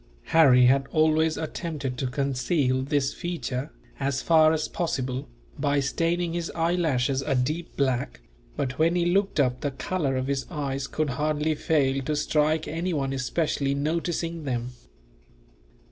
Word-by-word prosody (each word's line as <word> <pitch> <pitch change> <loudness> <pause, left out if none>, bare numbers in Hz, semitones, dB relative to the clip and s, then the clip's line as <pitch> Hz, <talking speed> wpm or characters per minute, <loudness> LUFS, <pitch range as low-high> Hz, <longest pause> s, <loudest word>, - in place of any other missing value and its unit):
Harry 130 -6 +7
had 135 +2 +3
always 155 +1 +2
attempted 155 -5 -4
to 130 +1 -2
conceal 130 +1 0
this 140 0 0
feature, 140 -6 -4 0.3
as 140 -1 0
far 155 -1 +5
as 155 -1 0
possible, 130 -6 -2 0.3
by 145 0 +2
staining 165 +5 0
his 170 -1 -3
eyelashes 160 -6 +1
a 135 - -1
deep 155 +7 -2
black; 130 -1 0 0.4
but 130 +1 -3
when 165 +2 +3
he 175 -1 +2
looked 195 0 +1
up, 125 -2 +1
the 145 - 0
colour 140 0 -2
of 130 - -1
his 135 0 -2
eyes 140 -4 -3
could 155 -3 -1
hardly 150 +3 0
fail 140 -4 +1
to 150 +3 -2
strike 155 +1 +1
anyone 155 -5 -2
specially 140 0 0
noticing 165 +2 -2
them. 125 -3 -2
145 Hz, 145 wpm, -26 LUFS, 135-165 Hz, 0.4 s, Harry